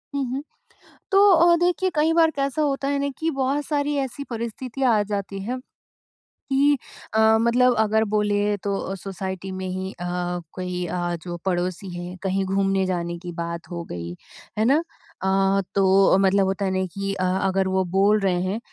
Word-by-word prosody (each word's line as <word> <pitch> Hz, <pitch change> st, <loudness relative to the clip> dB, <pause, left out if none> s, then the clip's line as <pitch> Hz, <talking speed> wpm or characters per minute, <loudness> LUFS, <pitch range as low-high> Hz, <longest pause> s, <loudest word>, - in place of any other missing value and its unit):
हुँ, 280 Hz, -, 0 dB
हुँ। 275 Hz, +3 st, -3 dB, 0.7 s
तो 400 Hz, +1 st, +6 dB
अ, 340 Hz, 0 st, +6 dB
देखिए 360 Hz, +1 st, +2 dB
कई 315 Hz, +2 st, +3 dB
बार 325 Hz, -1 st, +4 dB
कैसा 275 Hz, +1 st, -1 dB
होता 275 Hz, -1 st, 0 dB
है 280 Hz, 0 st, 0 dB
ना 280 Hz, 0 st, 0 dB
कि 325 Hz, +1 st, -1 dB
बहुत 275 Hz, +1 st, -1 dB
सारी 290 Hz, -1 st, 0 dB
ऐसी 275 Hz, +1 st, -3 dB
परिस्थितियाँ 235 Hz, +2 st, -1 dB
आ -, -, +3 dB
जाती 195 Hz, 0 st, -3 dB
हैं। 250 Hz, +4 st, -3 dB, 0.9 s
कि 280 Hz, +1 st, +4 dB, 0.4 s
अ, 220 Hz, -, +2 dB, 0.2 s
मतलब 245 Hz, +1 st, +4 dB
अगर 220 Hz, 0 st, +3 dB
बोलें 205 Hz, 0 st, +1 dB
तो 195 Hz, -1 st, -2 dB
सोसाइटी 190 Hz, 0 st, -5 dB
में 185 Hz, 0 st, -4 dB
ही 185 Hz, +1 st, -4 dB
अ, 175 Hz, -, -7 dB, 0.5 s
कोई 180 Hz, -1 st, -3 dB
अ, 175 Hz, 0 st, -2 dB
जो 175 Hz, -1 st, -6 dB
पड़ोसी 180 Hz, +1 st, -1 dB
हैं 180 Hz, +1 st, -7 dB
कहीं 195 Hz, 0 st, 0 dB
घूमने 195 Hz, 0 st, +1 dB
जाने 170 Hz, -2 st, -2 dB
की 175 Hz, -1 st, -7 dB
बात 170 Hz, +1 st, -5 dB
हो 170 Hz, -1 st, -5 dB
गई, 85 Hz, 0 st, -5 dB, 0.4 s
है 215 Hz, -, +2 dB
ना। 295 Hz, +6 st, +4 dB, 0.4 s
अ, 195 Hz, +1 st, +2 dB
तो 195 Hz, 0 st, +5 dB
मतलब 195 Hz, 0 st, +3 dB
होता 195 Hz, +1 st, -1 dB
है 190 Hz, -, 0 dB
ना 190 Hz, -, 0 dB
कि 195 Hz, 0 st, -2 dB
अ, 185 Hz, -1 st, -3 dB, 0.2 s
अगर 190 Hz, 0 st, +1 dB
वो 190 Hz, 0 st, +1 dB
बोल 205 Hz, +2 st, +4 dB
रहे 180 Hz, -3 st, +1 dB
हैं 190 Hz, +4 st, -2 dB
195 Hz, 180 wpm, -23 LUFS, 185-270 Hz, 0.9 s, तो